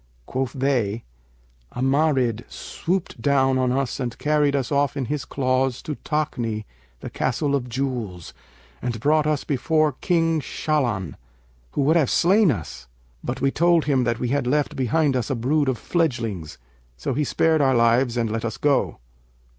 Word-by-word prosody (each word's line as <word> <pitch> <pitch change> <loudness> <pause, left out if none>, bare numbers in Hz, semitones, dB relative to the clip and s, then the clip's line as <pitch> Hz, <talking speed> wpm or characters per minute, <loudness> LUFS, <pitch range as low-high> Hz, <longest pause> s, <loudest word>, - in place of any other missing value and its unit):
Quoth 130 - -3
they: 120 -5 0 0.7
'A - - -4
Marid 135 -5 +2
swooped 175 -8 -3
down 135 0 +3
on 130 -1 +1
us 135 0 -1
and 120 -3 -3
carried 150 -1 +2
us 135 -1 -1
off 145 0 +1
in 135 - -1
his 145 +2 -3
claws 130 -1 0
to 155 - -3
Takni, 120 -9 -2 0.4
the - - -6
Castle 140 +3 -1
of 125 -3 -1
Jewels, 120 -9 -4 0.5
and 120 -2 -3
brought 150 +5 +2
us 150 -2 0
before 155 +2 +1
King 165 +3 +1
Shahlan, 120 - -1 0.6
who - - 0
would 155 +5 +4
have 150 -6 +2
slain 195 +3 +4
us; 75 - -4 0.4
but 125 +1 -4
we 135 - +2
told 170 +1 +3
him 135 -4 +2
that 120 0 0
we 120 - -2
had 135 -1 0
left 145 +2 +1
behind 135 +2 +1
us 125 -3 -1
a 135 - 0
brood 140 +4 +1
of 130 - -1
fledgelings; 115 - -2 0.4
so 65 - -2
he 150 +4 0
spared 160 +2 +2
our 135 -2 +3
lives 120 +1 +3
and 115 -2 0
let 115 0 -2
us 115 -2 -3
go. 145 -2 +1
135 Hz, 170 wpm, -23 LUFS, 120-150 Hz, 0.7 s, would